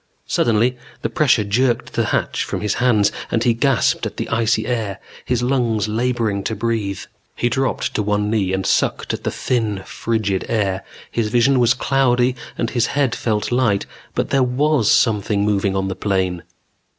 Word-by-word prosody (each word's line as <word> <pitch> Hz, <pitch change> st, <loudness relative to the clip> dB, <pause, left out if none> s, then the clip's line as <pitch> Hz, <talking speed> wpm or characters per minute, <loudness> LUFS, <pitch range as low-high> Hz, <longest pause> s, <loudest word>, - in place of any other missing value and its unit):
Suddenly 120 Hz, +2 st, +1 dB, 0.3 s
the -, -, -1 dB
pressure 130 Hz, -7 st, +3 dB
jerked 120 Hz, +4 st, 0 dB
the -, -, +1 dB
hatch -, -, -1 dB
from -, -, -4 dB
his 105 Hz, -2 st, 0 dB
hands 110 Hz, -5 st, +3 dB, 0.2 s
and 115 Hz, -, 0 dB
he 120 Hz, -, +3 dB
gasped 125 Hz, 0 st, +1 dB
at -, -, -10 dB
the -, -, -3 dB
icy 115 Hz, -1 st, +1 dB
air, 110 Hz, -5 st, -2 dB, 0.3 s
his 125 Hz, -1 st, 0 dB
lungs 120 Hz, -5 st, +1 dB
laboring 115 Hz, -3 st, -1 dB
to 110 Hz, -, -1 dB
breathe. 110 Hz, -3 st, -2 dB, 0.3 s
He 120 Hz, -, 0 dB
dropped 130 Hz, +2 st, -1 dB
to -, -, 0 dB
one 105 Hz, 0 st, 0 dB
knee 105 Hz, -4 st, 0 dB
and 95 Hz, 0 st, -1 dB
sucked -, -, 0 dB
at -, -, -5 dB
the -, -, 0 dB
thin, 110 Hz, -6 st, -1 dB
frigid 110 Hz, -4 st, -1 dB
air. 100 Hz, -4 st, 0 dB, 0.3 s
His 115 Hz, -2 st, 0 dB
vision 125 Hz, +3 st, +3 dB
was 120 Hz, +1 st, +4 dB
cloudy 125 Hz, -2 st, +2 dB, 0.2 s
and 115 Hz, -, -1 dB
his 120 Hz, -2 st, +1 dB
head 140 Hz, -5 st, +2 dB
felt 110 Hz, -1 st, -1 dB
light. 120 Hz, -5 st, +2 dB, 0.3 s
But -, -, -1 dB
there 135 Hz, -, +3 dB
was 130 Hz, -1 st, +2 dB
something 105 Hz, -2 st, +2 dB
moving 100 Hz, -2 st, +1 dB
on 95 Hz, 0 st, 0 dB
the 95 Hz, -, -3 dB
plain. 95 Hz, -3 st, -1 dB
115 Hz, 175 wpm, -20 LUFS, 105-125 Hz, 0.3 s, was